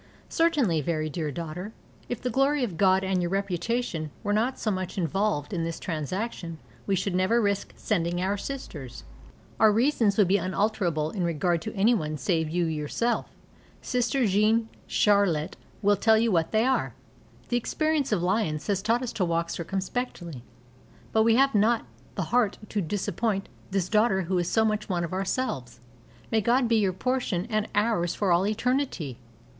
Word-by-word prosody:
Certainly, 285 Hz, -, +2 dB
very 155 Hz, 0 st, -2 dB
dear 155 Hz, -1 st, -2 dB
daughter, 170 Hz, +7 st, -6 dB, 0.4 s
if 245 Hz, -, -3 dB
the 250 Hz, -, -2 dB
glory 275 Hz, +3 st, +2 dB
of 205 Hz, -8 st, -2 dB
God 190 Hz, +2 st, +3 dB
and 190 Hz, -1 st, 0 dB
your 175 Hz, -, -1 dB
reputation 195 Hz, -2 st, -1 dB
were 205 Hz, -1 st, 0 dB
not 235 Hz, +5 st, +1 dB
so 215 Hz, -, -1 dB
much 185 Hz, -1 st, -4 dB
involved 190 Hz, -2 st, 0 dB
in 170 Hz, -3 st, -1 dB
this 165 Hz, 0 st, -3 dB
transaction 170 Hz, -, -4 dB, 0.3 s
we 195 Hz, -, +2 dB
should 190 Hz, +1 st, -1 dB
never 185 Hz, +6 st, +2 dB
risk 200 Hz, -2 st, 0 dB
sending 175 Hz, -4 st, -1 dB
our 190 Hz, +3 st, 0 dB
sisters. 185 Hz, -, -7 dB, 0.6 s
Our 220 Hz, -1 st, +6 dB
reasons 225 Hz, -3 st, +2 dB
would 205 Hz, -4 st, +5 dB
be 195 Hz, +3 st, +4 dB
unalterable 185 Hz, -4 st, 0 dB
in 190 Hz, -, -2 dB
regard 170 Hz, 0 st, 0 dB
to 165 Hz, -, -6 dB
anyone 195 Hz, -8 st, +2 dB
save 160 Hz, +2 st, 0 dB
you 175 Hz, +2 st, 0 dB
yourself. 160 Hz, +10 st, -1 dB, 0.6 s
Sister 250 Hz, +1 st, +1 dB
Jeanne 215 Hz, +3 st, +2 dB, 0.2 s
Charlotte 195 Hz, -6 st, +2 dB, 0.3 s
will 205 Hz, +1 st, +5 dB
tell 220 Hz, +2 st, +4 dB
you 230 Hz, 0 st, +2 dB
what 165 Hz, -3 st, +1 dB
they 220 Hz, +1 st, +3 dB
are. 260 Hz, 0 st, 0 dB, 0.5 s
The 240 Hz, -, +2 dB
experience 310 Hz, +3 st, 0 dB
of 190 Hz, -5 st, +1 dB
Lyons 180 Hz, -6 st, 0 dB
has 195 Hz, -2 st, 0 dB
taught 230 Hz, +4 st, +1 dB
us 245 Hz, -, -4 dB
to 195 Hz, -, 0 dB
walk 170 Hz, 0 st, -1 dB
circumspectly. 175 Hz, -, -4 dB, 0.7 s
But 220 Hz, -, +4 dB
we 225 Hz, 0 st, +4 dB
have 275 Hz, +2 st, +4 dB
not 220 Hz, -, +3 dB, 0.3 s
the 195 Hz, -, -1 dB
heart 240 Hz, -5 st, +3 dB
to 210 Hz, -, -1 dB
disappoint 200 Hz, +3 st, -2 dB, 0.2 s
this 190 Hz, -2 st, 0 dB
daughter 210 Hz, -2 st, +2 dB
who 180 Hz, +1 st, 0 dB
is 175 Hz, 0 st, -1 dB
so 220 Hz, -1 st, +3 dB
much 215 Hz, -1 st, -1 dB
one 175 Hz, -2 st, 0 dB
of 170 Hz, -, -4 dB
ourselves. 185 Hz, -, -2 dB, 0.5 s
May 220 Hz, -1 st, +3 dB
God 240 Hz, +4 st, +3 dB
be 230 Hz, -1 st, +3 dB
your 200 Hz, -3 st, +2 dB
portion 205 Hz, -3 st, -1 dB
and 215 Hz, 0 st, 0 dB
ours 205 Hz, -5 st, +1 dB
for 200 Hz, -3 st, +1 dB
all 175 Hz, +3 st, +3 dB
eternity! 215 Hz, -, -1 dB
195 Hz, 170 wpm, -27 LUFS, 170-225 Hz, 0.7 s, Our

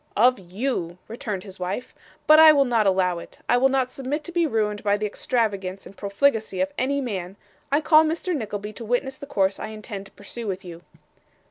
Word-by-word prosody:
'Of 250 Hz, +4 st, +5 dB
you,' 185 Hz, -2 st, -3 dB
returned 215 Hz, -4 st, -5 dB
his 195 Hz, -2 st, -11 dB
wife. 185 Hz, +7 st, -4 dB, 0.3 s
'But 310 Hz, 0 st, +8 dB
I 320 Hz, 0 st, +10 dB
will 280 Hz, -2 st, +4 dB
not 230 Hz, -4 st, +2 dB
allow 185 Hz, -2 st, +2 dB
it. -, -, -12 dB
I 245 Hz, -, +4 dB
will 265 Hz, +2 st, +4 dB
not 260 Hz, -1 st, +1 dB
submit 275 Hz, +4 st, -3 dB
to 345 Hz, -, -7 dB
be 340 Hz, -1 st, +2 dB
ruined 210 Hz, -5 st, -1 dB
by 205 Hz, 0 st, +2 dB
the 210 Hz, -, -2 dB
extravagance 200 Hz, -4 st, -2 dB
and 195 Hz, -, -12 dB
profligacy 215 Hz, 0 st, 0 dB
of 190 Hz, +1 st, 0 dB
any 280 Hz, +2 st, 0 dB
man. 195 Hz, -8 st, -4 dB, 0.4 s
I 290 Hz, +2 st, +3 dB
call 310 Hz, 0 st, +6 dB
Mr 330 Hz, +3 st, -1 dB
Nickleby 210 Hz, -4 st, -4 dB
to 230 Hz, -, -9 dB
witness 245 Hz, +4 st, -1 dB
the 285 Hz, -, -9 dB
course 195 Hz, -5 st, +1 dB
I -, -, -4 dB
intend 210 Hz, -2 st, -7 dB
to -, -, -20 dB
pursue 220 Hz, +3 st, -8 dB
with 190 Hz, 0 st, -4 dB
you. 170 Hz, -1 st, -9 dB
215 Hz, 210 wpm, -24 LUFS, 195-265 Hz, 0.4 s, I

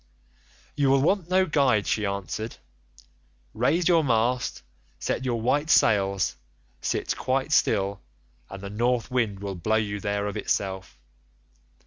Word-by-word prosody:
"'You 145 Hz, -2 st, +2 dB
will 135 Hz, 0 st, +4 dB
want 180 Hz, +1 st, +1 dB
no 185 Hz, +1 st, +3 dB
guide,' 135 Hz, -, +2 dB
she 105 Hz, -2 st, 0 dB
answered; 100 Hz, +3 st, -4 dB, 1.0 s
'raise 140 Hz, -, +1 dB
your 170 Hz, -3 st, +4 dB
mast, 125 Hz, -, 0 dB, 0.3 s
set -, -, -2 dB
your 120 Hz, -2 st, 0 dB
white 145 Hz, +7 st, 0 dB
sails, 100 Hz, -, +3 dB, 0.4 s
sit -, -, -1 dB
quite 135 Hz, +3 st, -1 dB
still, 100 Hz, -8 st, +2 dB, 0.5 s
and 95 Hz, 0 st, -9 dB
the 100 Hz, -, -5 dB
North 120 Hz, +3 st, 0 dB
Wind 110 Hz, -6 st, 0 dB
will 100 Hz, -1 st, -4 dB
blow 95 Hz, +5 st, -1 dB
you 105 Hz, -2 st, -1 dB
there 100 Hz, 0 st, -2 dB
of 105 Hz, +1 st, -3 dB
itself. 95 Hz, -8 st, -3 dB
110 Hz, 135 wpm, -26 LUFS, 100-135 Hz, 1.0 s, will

